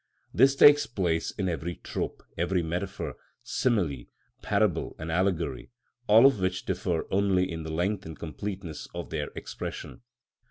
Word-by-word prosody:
This 135 +1 +5
takes 145 +1 +7
place 90 -7 0
in 95 -3 -3
every 85 0 -3
trope, - - -5
every 85 +1 0
metaphor, 85 +2 -4 0.3
simile, 90 - 0 0.4
parable, 100 -5 0
and 80 +1 -5
allegory, 85 -6 0 0.4
all 110 +4 +7
of 135 -6 +5
which 95 0 -1
differ 85 -2 -1
only 95 -2 +3
in 80 -1 -4
the 80 0 -5
length 90 +3 -1
and 80 - -8
completeness 90 0 -6
of 85 -1 -6
their 75 -2 -2
expression. - - -7
90 Hz, 145 wpm, -28 LUFS, 80-100 Hz, 0.4 s, takes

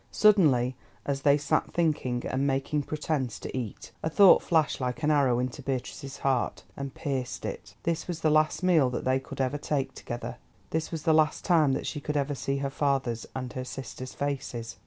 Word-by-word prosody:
Suddenly, 145 - +4 0.3
as 140 -1 -1
they 140 +1 +5
sat 145 - 0
thinking, 145 -7 0
and 135 +2 0
making 135 +2 0
pretence 145 -6 -2
to 100 - -7
eat, 120 -6 -5
a 160 - -1
thought 195 +3 +7
flashed 160 -5 +1
like 125 +4 -2
an 150 - +3
arrow 135 -5 +3
into 125 0 -2
Beatrice's 135 +1 -4
heart, 130 -3 0
and 140 -1 -6
pierced 130 -3 -3
it. - - -6
This 165 0 -1
was 170 -2 -4
the 155 - +3
last 155 +4 +2
meal 165 -8 +4
that 125 - -4
they 130 +1 +3
could 135 - -10
ever 135 +2 0
take 140 -3 -1
together, 120 0 -6 0.3
this 160 0 -1
was 160 -2 -4
the 160 - +4
last 155 -1 +2
time 160 -7 +4
that - - -2
she 145 - -4
could 150 +1 -2
ever 145 0 0
see 135 0 -2
her 140 0 -2
father's 135 -5 0
and 130 -1 -4
her 130 - -3
sister's 130 0 -7
faces. 130 -5 -3
140 Hz, 200 wpm, -28 LUFS, 130-155 Hz, 0.3 s, thought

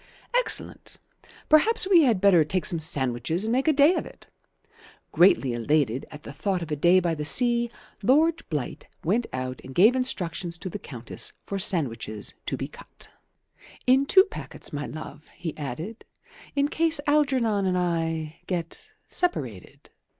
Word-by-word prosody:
"Excellent. - - 0 0.5
Perhaps 375 +7 +5
we 365 -4 +6
had 230 -7 +2
better 185 -4 +5
take 170 +3 -2
some 170 - +3
sandwiches 145 - 0
and 225 - -1
make 260 +5 0
a - - +6
day 295 +3 +5
of - - -2
it." - - -14 0.9
Greatly 155 -8 +4
elated 130 +1 0
at 150 0 -12
the 140 - -9
thought 185 +4 -2
of 160 - -9
a - - 0
day 175 +5 +4
by 170 -2 -1
the 150 -2 -4
sea, 240 +7 +5 0.3
Lord 315 +9 +3
Blight 150 -6 -5 0.2
went 225 +8 0
out 130 0 -5
and 130 0 -11
gave 215 +8 +5
instructions 180 -8 -2
to 185 - -7
the - - -6
Countess 120 -4 -6
for 200 - -4
sandwiches 115 - -2
to - - -2
be - - -4
cut. - - -11 0.8
"In 265 +2 +3
two 380 +4 +7
packets, 405 - -9
my 145 0 -4
love," 155 -1 -9
he 165 -3 -6
added, 155 - -7 0.5
"in 280 0 +2
case 325 0 +1
Algernon 260 -9 +1
and 180 -1 0
I 165 -3 -2
get 170 -3 -4 0.3
separated." 125 - -3
180 Hz, 160 wpm, -25 LUFS, 150-250 Hz, 0.9 s, two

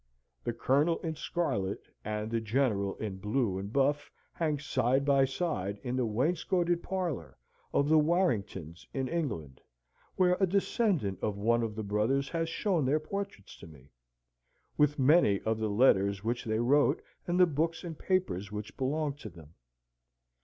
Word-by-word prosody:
The - - -1
colonel 145 +8 +2
in 160 -2 -2
scarlet, 125 - -2 0.2
and 105 +1 -3
the 115 -1 0
general 110 -4 0
in 105 -3 -5
blue 105 -1 0
and 100 +2 -6
buff, 140 +3 +1 0.2
hang 155 -3 0
side 135 -1 +1
by 140 -1 +4
side 130 - -2
in 125 -1 -2
the 125 -2 +1
wainscoted 170 - +1
parlour 170 - -3 0.3
of 140 - +2
the 155 +1 +5
Warringtons, 105 - 0
in 135 -1 -1
England, 105 - -3 0.5
where 180 -1 +3
a 190 - +3
descendant 185 - 0
of 105 -2 -1
one 115 +3 +2
of 110 -2 -3
the 110 - -4
brothers 110 +7 0
has 165 -1 -1
shown 175 -2 0
their 140 +4 +2
portraits 195 - -6
to - - -11
me, 70 -3 -17 0.8
with 150 0 +3
many 135 - +4
of 110 0 -1
the 110 -1 -1
letters 100 -3 +3
which 120 +3 -2
they 110 -1 0
wrote, 140 +5 +3 0.3
and 175 +1 +1
the 180 - +8
books 165 +1 -1
and 165 -3 -7
papers 140 - -1
which 105 0 -6
belonged 145 +2 -1
to 110 - -7
them. 80 -3 -15
130 Hz, 160 wpm, -30 LUFS, 105-160 Hz, 0.8 s, the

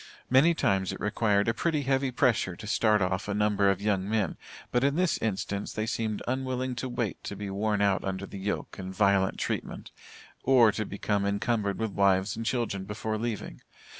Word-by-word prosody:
Many 150 +7 +5
times 95 - +1
it - - -7
required 105 0 +1
a 115 - +3
pretty 155 +3 0
heavy 135 0 +1
pressure 115 -7 +1
to 110 - -10
start 105 -1 +3
off 90 +1 -1
a 105 - -1
number 105 -1 +3
of 100 -1 +1
young 100 -2 0
men, 110 -3 0 0.4
but 125 +1 +2
in 140 +1 +2
this 180 -1 +1
instance 100 -1 -2
they 110 - -2
seemed 110 -2 -2
unwilling 130 0 -1
to 130 0 -3
wait 120 -4 -3
to 100 - -4
be 100 0 -5
worn 105 +1 0
out 100 -2 +2
under 95 0 -3
the 100 - -8
yoke 100 0 -4
and 95 0 -5
violent 100 -2 +3
treatment, - - -4 0.5
or 125 -4 +5
to 110 +1 -3
become 100 0 -1
encumbered 100 0 0
with 110 -2 -2
wives 100 0 +2
and 115 0 -4
children 110 -7 -1
before 110 +1 -3
leaving. 115 -3 -4
105 Hz, 195 wpm, -28 LUFS, 100-120 Hz, 0.5 s, Many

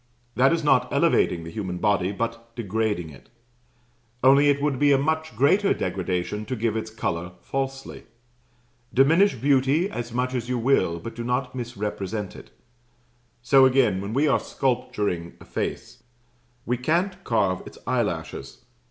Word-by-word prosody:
That 135 +3 +4
is 165 -1 0
not 125 -4 +3
elevating 85 - +2
the 80 - -8
human 95 -2 -4
body, 100 -1 +1
but 115 +2 -5
degrading 105 -6 -2
it; 70 - -16 0.9
only 140 +2 +6
it 145 0 +2
would 140 -2 0
be 145 0 +4
a 140 - +5
much 160 -1 -1
greater 190 - +3
degradation 95 +2 -2
to 130 - -3
give 115 -1 -1
its 110 0 -3
colour 90 -5 -3
falsely. 135 0 -5 0.9
Diminish 165 +9 +4
beauty 140 - +2
as 120 0 -5
much 125 +2 -1
as 125 -1 -3
you 125 - 0
will, 115 -9 +2
but 115 +7 -7
do 120 - -5
not 125 +2 -1
misrepresent 105 -4 -4
it. - - -12 0.9
So 130 +2 +6
again, 125 -8 +2
when 100 +3 -5
we 145 +3 +3
are 140 - +3
sculpturing 105 -9 -2
a - - -14
face, - - -5 0.6
we 125 +1 0
can't 180 +8 -1
carve 100 -6 +1
its - - -12
eyelashes. - - -3
120 Hz, 150 wpm, -24 LUFS, 105-135 Hz, 0.9 s, only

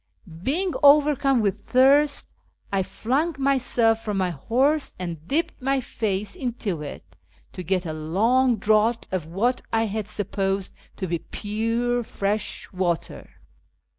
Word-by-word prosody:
Being 340 - 0
overcome 285 -3 +5
with 200 0 0
thirst, 280 +5 +3 0.4
I 195 - +2
flung 275 - -1
myself 245 -5 +2
from 210 -3 -2
my 185 -2 +1
horse 265 - 0
and 170 -3 -6
dipped 315 +1 -1
my 270 +1 +1
face 210 -5 -3
into 230 - -3
it 90 - -9 0.4
to 185 - -6
get 180 +1 -1
a 160 - -3
long 225 +11 +2
draught 215 +3 +2
of 180 -4 -2
what 225 +9 0
I 225 0 +2 0.2
sup 205 -1 -5
posed 195 -1 -1 0.2
to 190 - -3
be 170 -2 -2
pure 230 +6 -1
fresh 205 -1 -2
water. 175 -3 -2
220 Hz, 135 wpm, -24 LUFS, 190-260 Hz, 0.4 s, overcome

